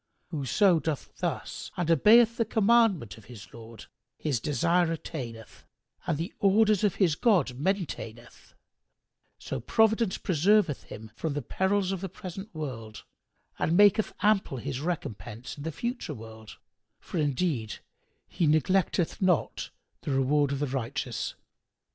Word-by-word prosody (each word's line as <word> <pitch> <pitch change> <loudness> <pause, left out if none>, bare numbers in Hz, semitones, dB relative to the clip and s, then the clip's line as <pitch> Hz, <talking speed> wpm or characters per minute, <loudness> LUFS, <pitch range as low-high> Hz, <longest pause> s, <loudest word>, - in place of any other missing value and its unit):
Whoso 165 - +3
doth 155 -3 -4
thus - - -4
and 175 -2 0
obeyeth 225 - +6
the 230 - +3
commandment 220 - +2
of 105 - -18
his 100 -6 -12
Lord, 115 -1 -11 0.3
his 145 -6 -1
desire 165 +6 +1
attaineth 120 -8 -7 0.4
and 160 - 0
the 165 +5 -4
orders 210 +1 +4
of 205 -4 +2
his 180 -6 +3
God 185 - +3
maintaineth; 150 - -4 0.8
so - - -5
Providence 220 -2 +2
preserveth 185 -1 +2
him 110 0 -10
from 155 +3 -3
the 145 -1 -3
perils 190 - 0
of 190 -2 -3
the 195 - -4
present 190 +3 -8
world 115 -8 -6 0.6
and 170 - +1
maketh 205 +1 +5
ample 205 -9 +2
his 130 +1 -4
recompense 115 - -5
in 145 - -10
the 160 +3 -3
future 240 - -4
world; 110 -1 -11 0.4
for 175 - -5
indeed 145 -6 -1 0.5
He 170 - 0
neglecteth 175 +4 +1
not 185 -3 +1 0.3
the - - -6
reward 140 +1 +2
of 140 - -1
the 145 - -1
righteous. 130 -4 -3
160 Hz, 135 wpm, -28 LUFS, 130-195 Hz, 0.8 s, obeyeth